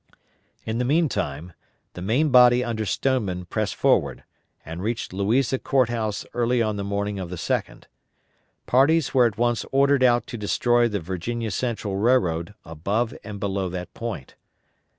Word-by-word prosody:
In 110 +1 -2
the - - +1
meantime, 90 - -1 0.4
the 90 - -8
main 125 - +1
body 125 -1 +6
under 110 -3 -3
Stoneman 100 -7 -1
pressed 110 +3 -2
forward, - - +1 0.4
and 80 +2 -7
reached 110 -1 -3
Louisa 115 +7 +1
Court 130 -4 +1
House 110 -3 -3
early 120 0 +1
on 110 -2 0
the 100 - -3
morning 100 0 -2
of 90 -2 -5
the 90 - -5
2d. 85 - -3 0.8
Parties 140 +3 +3
were 125 -3 +5
at 105 -3 -6
once 120 0 +1
ordered 140 0 +3
out 120 -1 +4
to 120 - -7
destroy 120 +3 +2
the 105 -3 -2
Virginia 100 +6 -4
Central 105 -2 -2
Railroad 100 -6 +1
above 100 +9 -2
and 105 -2 -7
below 95 -2 -2
that 90 0 -6
point. 115 - -6
110 Hz, 155 wpm, -24 LUFS, 95-125 Hz, 0.8 s, body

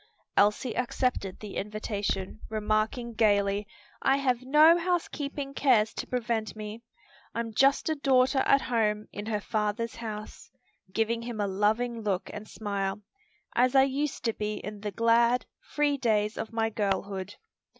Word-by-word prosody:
Elsie 210 +4 +2
accepted 250 -6 -1
the 210 -2 -6
invitation, 205 -1 -3
remarking 215 +2 -1
gayly, 205 -2 +2 0.3
"I 270 0 +3
have 255 -3 +1
no 300 +5 +6
housekeeping 295 -5 -2
cares 235 -7 +3
to - - -5
prevent 225 -4 -2
me. 215 +1 -7 0.5
I'm 230 -1 -3
just 275 +5 +3
a 315 - +2
daughter 270 -2 +3
at 275 +1 +4
home 215 -3 0
in 205 +1 -6
her 215 -2 0
father's 215 +2 -2
house," 215 -2 -7 0.4
giving 225 +3 0
him 235 -2 -6
a 205 - +1
loving 220 +4 0
look 200 -3 -2
and 210 0 -7
smile, 200 -1 -3 0.5
"as 250 +2 +3
I 265 - +8
used 275 +1 -1
to 230 - +2
be 210 0 -3
in 210 -1 -7
the 210 - -3
glad, 235 +3 +3
free 290 -1 0
days 215 -4 +1
of 220 - -5
my 225 -1 0
girlhood." 200 -2 -2
225 Hz, 150 wpm, -28 LUFS, 210-250 Hz, 0.5 s, I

